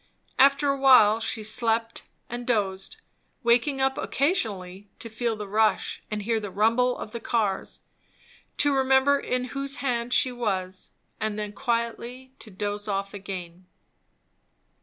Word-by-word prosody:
After 275 Hz, +1 st, +5 dB
a 275 Hz, 0 st, 0 dB
while 230 Hz, -5 st, +6 dB
she 225 Hz, 0 st, -2 dB
slept 225 Hz, +1 st, 0 dB, 0.2 s
and 240 Hz, 0 st, -6 dB
dozed, 200 Hz, -, -1 dB, 0.5 s
waking 245 Hz, +4 st, +2 dB
up 265 Hz, 0 st, +1 dB
occasionally 205 Hz, -, -1 dB
to 230 Hz, -, -7 dB
feel 230 Hz, +1 st, -1 dB
the 210 Hz, -1 st, -7 dB
rush 215 Hz, +2 st, +1 dB
and 210 Hz, -1 st, -3 dB
hear 225 Hz, +1 st, 0 dB
the 205 Hz, -2 st, -6 dB
rumble 230 Hz, +6 st, +2 dB
of 215 Hz, -, -7 dB
the 235 Hz, -, -5 dB
cars, 215 Hz, -4 st, -1 dB, 0.8 s
to 290 Hz, -1 st, +3 dB
remember 265 Hz, +1 st, +3 dB
in 250 Hz, -1 st, -2 dB
whose 275 Hz, 0 st, -2 dB
hand 245 Hz, -3 st, -2 dB
she 255 Hz, -, +3 dB
was, 190 Hz, -6 st, -3 dB, 0.3 s
and 215 Hz, -1 st, -2 dB
then 210 Hz, -1 st, -4 dB
quietly 240 Hz, +2 st, -3 dB
to 220 Hz, -, -11 dB
doze 205 Hz, +1 st, -4 dB
off 195 Hz, -1 st, -2 dB
again. 185 Hz, -3 st, -8 dB
230 Hz, 140 wpm, -26 LUFS, 205-255 Hz, 0.8 s, while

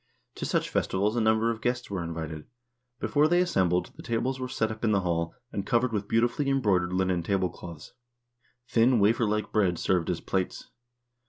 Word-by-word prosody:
To -, -, -3 dB
such -, -, -1 dB
festi 95 Hz, -, 0 dB
vals 105 Hz, +3 st, +1 dB
a 120 Hz, -, +1 dB
number 110 Hz, +1 st, +3 dB
of 115 Hz, -1 st, -6 dB
guests 120 Hz, -2 st, -2 dB
were 95 Hz, -3 st, -2 dB
invited. 80 Hz, -2 st, -6 dB, 0.5 s
Before 150 Hz, +1 st, +2 dB
they 175 Hz, +2 st, +3 dB
assembled, 90 Hz, -, +1 dB
the -, -, -10 dB
tables 125 Hz, +3 st, -1 dB
were 130 Hz, -, -3 dB
set 110 Hz, -3 st, -1 dB
up 110 Hz, +1 st, -8 dB
in 110 Hz, -2 st, +3 dB
the 100 Hz, -, +2 dB
hall, 85 Hz, -2 st, -1 dB, 0.2 s
and 100 Hz, -, -3 dB
covered 120 Hz, +3 st, +1 dB
with 100 Hz, -1 st, -2 dB
beautifully 120 Hz, +6 st, +1 dB
embroi 120 Hz, -9 st, +3 dB
dered 90 Hz, 0 st, -4 dB
linen 95 Hz, -2 st, +1 dB
tablecloths. 85 Hz, -3 st, -3 dB, 0.7 s
Thin 120 Hz, 0 st, +3 dB
wafer 110 Hz, +3 st, +3 dB
like 105 Hz, 0 st, -1 dB
bread 95 Hz, -5 st, +2 dB
served 90 Hz, -1 st, 0 dB
as 85 Hz, -2 st, -1 dB
plates. 95 Hz, -1 st, -3 dB
105 Hz, 190 wpm, -28 LUFS, 90-115 Hz, 0.7 s, number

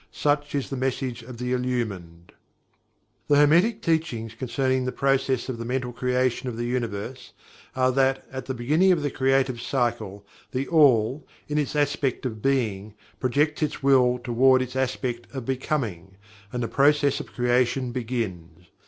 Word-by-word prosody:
Such 145 Hz, 0 st, 0 dB
is 140 Hz, -1 st, -2 dB
the 135 Hz, -, -2 dB
message 130 Hz, -2 st, -2 dB
of 120 Hz, +1 st, -10 dB
the 125 Hz, +1 st, -2 dB
Illumined. 105 Hz, -10 st, -3 dB, 1.0 s
The 145 Hz, -, +4 dB
Hermetic 170 Hz, +10 st, +4 dB
Teachings 125 Hz, -9 st, -1 dB
concerning 130 Hz, +2 st, -1 dB
the 130 Hz, -, -1 dB
process 135 Hz, -2 st, 0 dB
of 125 Hz, -3 st, -4 dB
the -, -, -3 dB
Mental 125 Hz, +1 st, -2 dB
Creation 125 Hz, 0 st, 0 dB
of 115 Hz, -, -6 dB
the 120 Hz, -, -2 dB
Universe, 120 Hz, 0 st, -4 dB, 0.4 s
are 130 Hz, 0 st, +3 dB
that 135 Hz, 0 st, +1 dB
at 130 Hz, -1 st, -6 dB
the 130 Hz, -, -3 dB
beginning 155 Hz, +10 st, +3 dB
of 165 Hz, -5 st, +1 dB
the 145 Hz, -, -1 dB
Creative 130 Hz, -2 st, +1 dB
Cycle, 115 Hz, -6 st, -2 dB, 0.3 s
THE 135 Hz, +1 st, -1 dB
ALL, 135 Hz, -4 st, +3 dB, 0.2 s
in 150 Hz, 0 st, 0 dB
its 150 Hz, 0 st, -2 dB
aspect 145 Hz, -3 st, 0 dB
of 110 Hz, -4 st, -4 dB
Being, 110 Hz, -6 st, -1 dB, 0.2 s
projects 145 Hz, +5 st, +1 dB
its 150 Hz, -2 st, -2 dB
Will 125 Hz, -2 st, +4 dB
toward 130 Hz, +2 st, +3 dB
its 125 Hz, 0 st, -8 dB
aspect 125 Hz, -2 st, -2 dB
of 130 Hz, -3 st, -5 dB
"Becoming" 115 Hz, -, -3 dB, 0.4 s
and 125 Hz, -1 st, -2 dB
the -, -, -1 dB
process 145 Hz, +1 st, +3 dB
of -, -, -8 dB
creation 125 Hz, +1 st, +1 dB
begins. 95 Hz, -9 st, -5 dB
130 Hz, 160 wpm, -25 LUFS, 120-135 Hz, 1.0 s, The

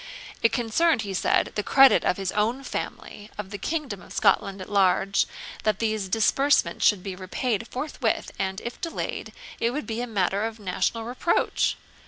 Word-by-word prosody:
It 230 Hz, -, +4 dB
concerned, 245 Hz, +3 st, +2 dB
he 200 Hz, -1 st, -5 dB
said, 190 Hz, -, +1 dB
the 210 Hz, -, -1 dB
credit 270 Hz, +5 st, +6 dB
of -, -, +1 dB
his 195 Hz, -2 st, -2 dB
own 230 Hz, +6 st, 0 dB
family, 210 Hz, -5 st, -6 dB
and 210 Hz, -, -4 dB
of 190 Hz, -, -18 dB
the 205 Hz, -, -5 dB
kingdom 290 Hz, -, -3 dB
of -, -, -15 dB
Scotland 195 Hz, -1 st, +2 dB
at 185 Hz, -, -8 dB
large, 195 Hz, 0 st, +3 dB, 0.3 s
that 215 Hz, -2 st, +1 dB
these 215 Hz, -3 st, -1 dB
disbursements 225 Hz, -2 st, +2 dB
should 195 Hz, -3 st, +2 dB
be 195 Hz, -2 st, -5 dB
repaid 215 Hz, +4 st, -2 dB
forthwith, 290 Hz, +5 st, -2 dB
and, 190 Hz, 0 st, -2 dB
if 235 Hz, -, -7 dB
delayed, 330 Hz, -, -4 dB, 0.3 s
it 230 Hz, -, +2 dB
would 295 Hz, +5 st, -3 dB
be 225 Hz, 0 st, -3 dB
a 245 Hz, -, -3 dB
matter 200 Hz, -2 st, 0 dB
of 225 Hz, 0 st, -9 dB
national 195 Hz, +3 st, -1 dB
reproach. 245 Hz, +8 st, 0 dB
215 Hz, 180 wpm, -25 LUFS, 195-245 Hz, 0.3 s, credit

